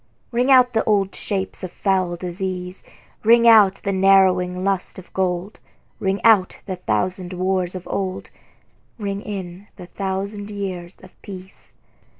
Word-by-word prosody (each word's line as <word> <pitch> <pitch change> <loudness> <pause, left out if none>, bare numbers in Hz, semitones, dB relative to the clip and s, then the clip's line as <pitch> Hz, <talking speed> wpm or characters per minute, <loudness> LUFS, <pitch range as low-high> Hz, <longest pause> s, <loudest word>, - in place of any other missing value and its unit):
Ring 245 +2 +1
out 250 -2 +5
old 200 -2 +2
shapes 195 -1 -4
of 185 - -5
foul 185 -3 0
disease, 180 +1 -5 0.4
Ring 235 +1 +5
out 215 -4 +7
the 200 - 0
narrowing 185 -1 +3
lust 195 -2 -1
of 185 - -13
gold; 185 +1 -2 0.4
Ring 195 +1 0
out 210 -5 +4
the 185 -2 -4
thousand 180 - -2
wars 185 0 -1
of 185 - -7
old, 190 -2 -4 0.7
Ring 200 -2 -4
in 195 -1 -7
the 180 - -10
thousand 200 +2 -4
years 190 -3 -5
of - - -14
peace. 190 -1 -12
190 Hz, 140 wpm, -21 LUFS, 180-200 Hz, 0.7 s, out